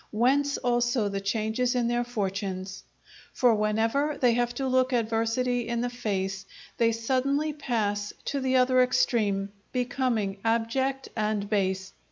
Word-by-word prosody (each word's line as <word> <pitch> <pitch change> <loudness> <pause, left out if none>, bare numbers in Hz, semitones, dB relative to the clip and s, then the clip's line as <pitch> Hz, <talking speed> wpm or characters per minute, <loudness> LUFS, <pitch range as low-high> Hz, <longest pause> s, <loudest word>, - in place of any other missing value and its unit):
Whence 275 +6 +2
also 240 -2 +1
the 200 0 -3
changes 220 +5 0
in 240 -1 +1
their 240 0 +1
fortunes. 195 -4 -4 0.5
For 245 -2 +4
whenever 225 +8 +1
they 245 -2 +4
have 240 0 +1
to 270 - -2
look 255 0 +2
adversity 230 +1 0
in 235 0 -1
the 245 0 -2
face, 195 -5 -3 0.3
they 230 -1 +3
suddenly 270 +6 0
pass 210 -8 -1
to 280 - -1
the 260 -1 0
other 255 0 +4
extreme, 205 -5 +1 0.2
becoming 245 -5 -1
abject 260 +4 0
and 215 -2 -1
base. 190 -2 -1
235 Hz, 140 wpm, -27 LUFS, 210-255 Hz, 0.5 s, For